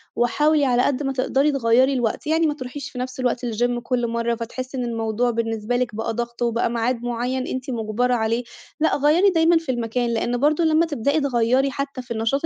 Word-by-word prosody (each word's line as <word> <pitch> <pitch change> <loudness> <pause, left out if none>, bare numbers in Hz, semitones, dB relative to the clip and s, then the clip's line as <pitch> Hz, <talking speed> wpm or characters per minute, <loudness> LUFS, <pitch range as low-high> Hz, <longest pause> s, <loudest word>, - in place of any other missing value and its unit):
وحاولي 295 +5 +2
على 245 -2 +3
قد 285 0 0
ما 270 -1 -1
تقدري 270 +3 +1
تغيَّري 260 0 +3
الوقت، 240 +1 -1
يعني 320 +1 +2
ما 295 - 0
تروحيش 280 +1 -7
في 250 - -7
نفس 255 +1 -5
الوقت 250 -1 -1
الGym 240 +1 0
كُلّ 245 -1 0
مَرَّة، 235 0 -1
فتحسي 255 +3 -6
إن 250 - -1
الموضوع 225 +1 -1
بالنسبة 225 0 -2
لِك 245 -3 -1
بقى 225 +1 -2
ضغط، 235 +1 -5
وبقى 235 0 +1
معاد 235 +1 -1
مُعيّن 245 +2 -2
أنتِ 260 +1 -4
مُجبرة 235 +1 0
عليه 230 +1 0 0.4
لأ، 315 - +2
غيَّري 310 +8 +4
دايمًا 335 -1 +4
في 325 -5 -2
المكان، 240 0 -1
لإن 235 +1 -1
برضه 300 +5 +2
لمّا 320 +1 +3
تِبدَئي 285 0 0
تغيَّري 260 0 +2
حتى 275 -1 -4
في 245 -1 -15
النشاط 230 +7 0
250 Hz, 200 wpm, -22 LUFS, 235-275 Hz, 0.4 s, غيَّري